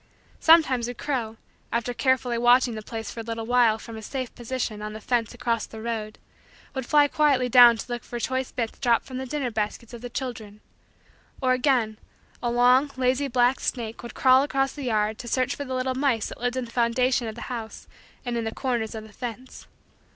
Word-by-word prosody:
Sometimes 300 Hz, -8 st, +5 dB
a 245 Hz, -, -5 dB
crow, 235 Hz, -6 st, -3 dB, 0.3 s
after 235 Hz, +1 st, -1 dB
carefully 250 Hz, -2 st, +1 dB
watching 245 Hz, 0 st, +4 dB
the 215 Hz, -, -5 dB
place 225 Hz, -1 st, -6 dB
for -, -, -8 dB
a -, -, -4 dB
little 230 Hz, 0 st, -4 dB
while 240 Hz, -2 st, +4 dB
from 225 Hz, 0 st, -9 dB
a -, -, -7 dB
safe 255 Hz, +2 st, -5 dB
position 240 Hz, -3 st, -4 dB
on 210 Hz, 0 st, -5 dB
the 215 Hz, -, -7 dB
fence 235 Hz, +1 st, -1 dB
across 235 Hz, -2 st, -1 dB
the 220 Hz, -, -10 dB
road, 220 Hz, -2 st, -4 dB, 0.6 s
would 265 Hz, -3 st, -4 dB
fly 295 Hz, -1 st, +5 dB
quietly 280 Hz, -4 st, +2 dB
down 240 Hz, -1 st, +8 dB
to -, -, -6 dB
look 240 Hz, -1 st, -4 dB
for 240 Hz, -, -6 dB
choice 260 Hz, +2 st, -2 dB
bits 230 Hz, -2 st, -4 dB
dropped 240 Hz, -3 st, +2 dB
from 255 Hz, -1 st, -6 dB
the 265 Hz, -, -5 dB
dinner 270 Hz, -2 st, -2 dB
baskets 215 Hz, +2 st, -3 dB
of 235 Hz, -, -8 dB
the 245 Hz, -, -6 dB
children. 225 Hz, -5 st, -6 dB, 0.8 s
Or 255 Hz, -2 st, +2 dB
again, 250 Hz, -5 st, +1 dB, 0.4 s
a 240 Hz, -, 0 dB
long, 250 Hz, +4 st, +4 dB
lazy, 260 Hz, +2 st, +1 dB
black 250 Hz, 0 st, +2 dB
snake 230 Hz, -3 st, -3 dB
would 235 Hz, -, -9 dB
crawl 260 Hz, 0 st, +5 dB
across 270 Hz, -1 st, 0 dB
the 285 Hz, -3 st, -6 dB
yard 215 Hz, -2 st, 0 dB
to 240 Hz, -, -7 dB
search 255 Hz, +1 st, 0 dB
for 285 Hz, -, -5 dB
the 260 Hz, -1 st, -4 dB
little 255 Hz, 0 st, -1 dB
mice 260 Hz, -5 st, 0 dB
that -, -, -10 dB
lived 245 Hz, +1 st, -1 dB
in 255 Hz, -, -2 dB
the 230 Hz, -, -13 dB
foundation 245 Hz, +1 st, +1 dB
of 220 Hz, -, -6 dB
the 235 Hz, -, -9 dB
house 230 Hz, -3 st, -7 dB, 0.4 s
and 245 Hz, -1 st, -2 dB
in 230 Hz, -, -1 dB
the 225 Hz, 0 st, -4 dB
corners 240 Hz, -4 st, -2 dB
of 220 Hz, -, -6 dB
the 215 Hz, -1 st, -14 dB
fence. 245 Hz, +3 st, -8 dB
245 Hz, 215 wpm, -25 LUFS, 225-260 Hz, 0.8 s, down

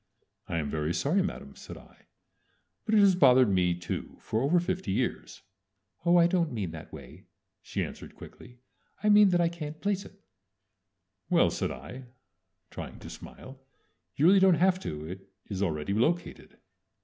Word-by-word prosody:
"I -, -, -3 dB
am 75 Hz, -3 st, -2 dB
very 75 Hz, +3 st, -2 dB
sorry, 175 Hz, +8 st, +1 dB
Madame," 190 Hz, -, -5 dB
said -, -, -10 dB
I, -, -, -19 dB, 0.8 s
"but 220 Hz, -, +1 dB
it 210 Hz, -, +6 dB
has 200 Hz, -1 st, +6 dB
bothered 130 Hz, -, +5 dB
me 90 Hz, -2 st, +2 dB
too 85 Hz, 0 st, -6 dB
for 110 Hz, -, -2 dB
over 155 Hz, +7 st, +3 dB
fifty 185 Hz, -, -3 dB
years." -, -, -3 dB, 0.6 s
"Oh, 175 Hz, +1 st, +6 dB
I 170 Hz, -, +6 dB
don't 170 Hz, -2 st, +1 dB
mean 100 Hz, -8 st, -4 dB
that 80 Hz, -1 st, -10 dB
way," 70 Hz, -5 st, -12 dB, 0.4 s
she -, -, -3 dB
answered -, -, -11 dB
quickly. 125 Hz, +1 st, -14 dB, 0.5 s
"I 210 Hz, -, +3 dB
mean 205 Hz, -1 st, +7 dB
that 175 Hz, -1 st, +2 dB
I 170 Hz, -, +3 dB
can't 155 Hz, -2 st, -7 dB
place 200 Hz, -1 st, -1 dB
it." -, -, -16 dB, 1.1 s
"Well," -, -, +3 dB
said -, -, -2 dB
I, 120 Hz, -, -9 dB, 0.7 s
trying -, -, -8 dB
to -, -, -10 dB
smile, 130 Hz, +1 st, -12 dB, 0.6 s
"you 145 Hz, -, +1 dB
really 195 Hz, +3 st, +7 dB
don't 190 Hz, -2 st, +5 dB
have 185 Hz, +3 st, +2 dB
to. 75 Hz, -, -6 dB
It 90 Hz, +4 st, -8 dB, 0.2 s
is 100 Hz, -2 st, -5 dB
already 80 Hz, -1 st, -1 dB
located." 160 Hz, +11 st, -2 dB
140 Hz, 170 wpm, -28 LUFS, -, 1.1 s, mean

